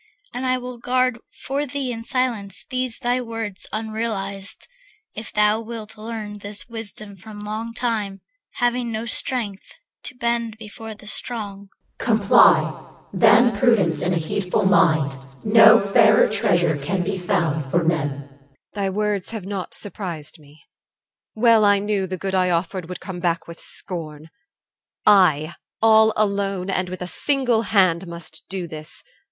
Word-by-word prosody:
And 255 Hz, +1 st, -3 dB
I 255 Hz, 0 st, +2 dB
will 250 Hz, -1 st, -8 dB
guard 255 Hz, 0 st, +1 dB
for 280 Hz, +2 st, -3 dB
thee 275 Hz, -1 st, -3 dB
In 230 Hz, -1 st, -6 dB
silence 230 Hz, -6 st, 0 dB
these 255 Hz, -2 st, -2 dB
thy 250 Hz, 0 st, 0 dB
words 225 Hz, -5 st, -5 dB
unrealized; 215 Hz, -2 st, -3 dB, 0.5 s
If 220 Hz, -, -6 dB
thou 210 Hz, +1 st, +2 dB
wilt 225 Hz, -1 st, -7 dB
learn 215 Hz, -1 st, -6 dB
this 205 Hz, -1 st, -1 dB
wisdom 215 Hz, -3 st, -6 dB
from 210 Hz, +2 st, -11 dB
long 215 Hz, +2 st, -4 dB
time, 215 Hz, -6 st, -2 dB, 0.3 s
Having 245 Hz, -1 st, 0 dB
no 220 Hz, +1 st, -3 dB
strength, 225 Hz, -4 st, -2 dB, 0.3 s
to -, -, -3 dB
bend 235 Hz, -2 st, -1 dB
before 220 Hz, 0 st, -9 dB
the 210 Hz, -, -16 dB
strong. 205 Hz, -3 st, -2 dB
CH. -, -, -42 dB
Comply. 215 Hz, -4 st, +4 dB, 0.3 s
Than 225 Hz, +1 st, +5 dB
prudence 205 Hz, -7 st, +2 dB
and 180 Hz, +1 st, +1 dB
a -, -, +1 dB
heedful 180 Hz, +4 st, -1 dB
mind, 155 Hz, -8 st, +3 dB, 0.2 s
No 220 Hz, +1 st, +7 dB
fairer 215 Hz, +1 st, +5 dB
treasure 180 Hz, -7 st, +2 dB
can 180 Hz, +6 st, -2 dB
be 190 Hz, +1 st, -2 dB
found 165 Hz, -7 st, -1 dB
for 170 Hz, +4 st, +1 dB
men. 145 Hz, -4 st, -1 dB
EL. 140 Hz, 0 st, -24 dB, 0.3 s
Thy 200 Hz, -2 st, -1 dB
words 205 Hz, -1 st, -1 dB
have 220 Hz, -5 st, -6 dB
not 195 Hz, -2 st, -5 dB
surprised 175 Hz, -6 st, -7 dB
me. 145 Hz, 0 st, -19 dB, 0.7 s
Well 225 Hz, -1 st, +5 dB
I 205 Hz, 0 st, +5 dB
knew 200 Hz, -1 st, -1 dB
The 185 Hz, 0 st, -4 dB
good 190 Hz, +1 st, -4 dB
I 185 Hz, -1 st, +2 dB
offered 175 Hz, 0 st, -2 dB
would 180 Hz, -, -7 dB
come 190 Hz, -3 st, -6 dB
back 170 Hz, -1 st, -1 dB
with 170 Hz, 0 st, -10 dB
scorn. 160 Hz, -3 st, -8 dB, 0.7 s
I, 170 Hz, -6 st, +4 dB, 0.3 s
all 220 Hz, 0 st, +6 dB
alone 200 Hz, -2 st, 0 dB
and 185 Hz, -1 st, -1 dB
with 185 Hz, 0 st, -5 dB
a -, -, -5 dB
single 245 Hz, -, 0 dB
hand, 185 Hz, -5 st, +2 dB
Must 170 Hz, -2 st, -9 dB
do 190 Hz, -3 st, -4 dB
this. 155 Hz, -1 st, -10 dB
205 Hz, 155 wpm, -22 LUFS, 180-225 Hz, 0.7 s, No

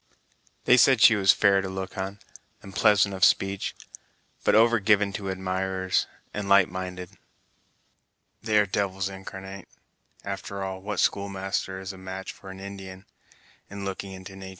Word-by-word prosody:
"They 125 Hz, -, +6 dB
said 130 Hz, 0 st, +5 dB
she 115 Hz, -, +8 dB
was 95 Hz, -2 st, +5 dB
fair 100 Hz, -2 st, +3 dB
to 95 Hz, -, -5 dB
look 95 Hz, 0 st, -6 dB
on, 95 Hz, +1 st, -4 dB, 0.5 s
and 95 Hz, -, -11 dB
pleasant 100 Hz, -1 st, +4 dB
of 95 Hz, 0 st, -3 dB
speech; 95 Hz, 0 st, +2 dB, 0.7 s
but -, -, +3 dB
over 115 Hz, +1 st, +5 dB
given 100 Hz, -1 st, +2 dB
to 95 Hz, 0 st, -4 dB
admirers, 95 Hz, 0 st, -1 dB, 0.3 s
and 100 Hz, -1 st, -4 dB
light 100 Hz, -2 st, +5 dB
minded." 90 Hz, -1 st, -6 dB, 1.3 s
"They 110 Hz, -1 st, +1 dB
are 105 Hz, -, +5 dB
devils 95 Hz, -1 st, -1 dB
incarnate! 95 Hz, 0 st, -9 dB, 0.6 s
After 100 Hz, 0 st, -5 dB
all, 95 Hz, 0 st, -5 dB
what 105 Hz, 0 st, -4 dB
schoolmaster 95 Hz, -1 st, -1 dB
is 95 Hz, 0 st, -6 dB
a 95 Hz, -, -12 dB
match 95 Hz, 0 st, -6 dB
for 95 Hz, -, -13 dB
an 95 Hz, 0 st, -9 dB
Indian, 95 Hz, -1 st, -9 dB, 0.6 s
in 100 Hz, -1 st, -7 dB
looking 95 Hz, 0 st, -5 dB
into 95 Hz, 0 st, -10 dB
natur'! 95 Hz, 0 st, -9 dB
95 Hz, 155 wpm, -26 LUFS, 95-100 Hz, 1.3 s, she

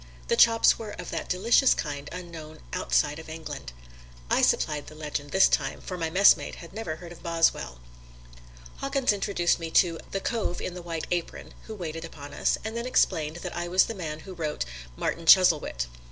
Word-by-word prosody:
The -, -, +3 dB
chops 230 Hz, -1 st, +5 dB
were 215 Hz, -2 st, -6 dB
of 180 Hz, -, -7 dB
that -, -, -4 dB
delicious 235 Hz, +8 st, +4 dB
kind 145 Hz, -2 st, -4 dB
unknown 165 Hz, -3 st, -9 dB
outside 65 Hz, -, +1 dB
of 160 Hz, -, -11 dB
England. 155 Hz, -, -7 dB, 0.6 s
I -, -, +4 dB
supplied 150 Hz, -1 st, +1 dB
the 155 Hz, -, -11 dB
legend 150 Hz, -2 st, -5 dB
this 190 Hz, +5 st, +5 dB
time, -, -, 0 dB
for 185 Hz, -, -6 dB
my 165 Hz, -2 st, -2 dB
messmate 195 Hz, +4 st, +4 dB
had 170 Hz, -, -12 dB
never 195 Hz, -8 st, -4 dB
heard 170 Hz, +1 st, -11 dB
of 175 Hz, -, -12 dB
Boswell. 165 Hz, -, 0 dB, 1.0 s
Hawkins 275 Hz, -4 st, +1 dB
introduced 195 Hz, -4 st, 0 dB
me 165 Hz, -1 st, -4 dB
to 165 Hz, 0 st, +3 dB
"the 195 Hz, -, -2 dB
cove 205 Hz, -4 st, -2 dB
in 180 Hz, -, -4 dB
the 180 Hz, -, -7 dB
white 165 Hz, -2 st, -4 dB
apron" 175 Hz, -1 st, -3 dB
who 220 Hz, -, -6 dB
waited 165 Hz, -4 st, -5 dB
upon 145 Hz, -3 st, -9 dB
us, -, -, +1 dB
and 220 Hz, +1 st, -4 dB
then 235 Hz, +1 st, -3 dB
explained 160 Hz, -10 st, +1 dB
that -, -, -5 dB
I 175 Hz, 0 st, -3 dB
was 185 Hz, +2 st, +5 dB
the -, -, -5 dB
man 160 Hz, -6 st, -5 dB
who 190 Hz, +3 st, -9 dB
wrote 155 Hz, -, -3 dB, 0.3 s
"Martin 165 Hz, -, -3 dB
Chuzzlewit." 160 Hz, -, +5 dB
170 Hz, 190 wpm, -27 LUFS, 155-190 Hz, 1.0 s, chops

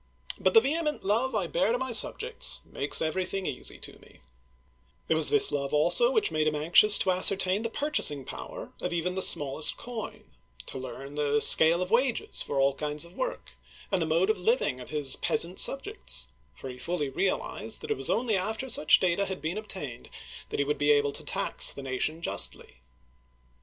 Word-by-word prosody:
But -, -, +1 dB
the 450 Hz, -, +8 dB
vehement 305 Hz, -1 st, -2 dB
love 230 Hz, +5 st, 0 dB
I 200 Hz, -4 st, 0 dB
bear 180 Hz, +5 st, 0 dB
to 240 Hz, -, 0 dB
my 260 Hz, 0 st, -4 dB
subjects 455 Hz, -, 0 dB
makes -, -, -1 dB
everything 185 Hz, +3 st, -3 dB
easy 125 Hz, -, -5 dB
to -, -, -11 dB
me/* -, -, -20 dB, 0.9 s
It -, -, +2 dB
was 160 Hz, -1 st, +2 dB
this -, -, +6 dB
love 140 Hz, 0 st, -2 dB
also 480 Hz, -, +4 dB
which 440 Hz, -4 st, 0 dB
made 155 Hz, 0 st, 0 dB
him 155 Hz, -, 0 dB
anxious 175 Hz, +8 st, +6 dB
to 190 Hz, -, +1 dB
ascertain 190 Hz, +1 st, +3 dB
the 230 Hz, -, -3 dB
purchasing 225 Hz, -, 0 dB
power -, -, -9 dB
of 180 Hz, -, -3 dB
even 175 Hz, +1 st, -2 dB
the 190 Hz, -, -3 dB
smallest 145 Hz, -2 st, 0 dB
coin, 235 Hz, -3 st, -8 dB, 0.4 s
to 130 Hz, -, -7 dB
learn 135 Hz, +2 st, -9 dB
the 145 Hz, 0 st, 0 dB
scale 165 Hz, +4 st, +6 dB
of 180 Hz, -, -9 dB
wages 245 Hz, +1 st, 0 dB
for 140 Hz, -, -3 dB
all 135 Hz, 0 st, +2 dB
kinds 150 Hz, +2 st, -3 dB
of 170 Hz, -, -17 dB
work, -, -, -5 dB, 0.4 s
and 190 Hz, -3 st, +1 dB
the 160 Hz, -, -1 dB
mode 170 Hz, +6 st, +2 dB
of 215 Hz, -, -5 dB
liv 230 Hz, +8 st, +1 dB
ing 130 Hz, -, -2 dB
of 125 Hz, -, -11 dB
his 145 Hz, -3 st, -2 dB
peasant 185 Hz, -5 st, 0 dB
subjects, 405 Hz, +11 st, 0 dB, 0.3 s
for -, -, -10 dB
he 125 Hz, -1 st, -9 dB
fully 150 Hz, -3 st, -3 dB
realized 190 Hz, +8 st, -2 dB
that 445 Hz, -, -6 dB
it 435 Hz, -, -1 dB
was -, -, 0 dB
only 230 Hz, -2 st, 0 dB
after 220 Hz, +7 st, -3 dB
such 155 Hz, -, +4 dB
data 185 Hz, +2 st, 0 dB
had 190 Hz, -1 st, -5 dB
been 170 Hz, +7 st, -4 dB
obtained 145 Hz, -, -7 dB, 0.4 s
that -, -, -4 dB
he 140 Hz, -, 0 dB
would 150 Hz, +1 st, -2 dB
be 145 Hz, 0 st, +1 dB
able 145 Hz, -1 st, +3 dB
to -, -, -9 dB
tax -, -, +2 dB
the 140 Hz, -, -8 dB
nation 140 Hz, +5 st, -3 dB
justly. 65 Hz, -, 0 dB
180 Hz, 200 wpm, -27 LUFS, 150-220 Hz, 0.9 s, the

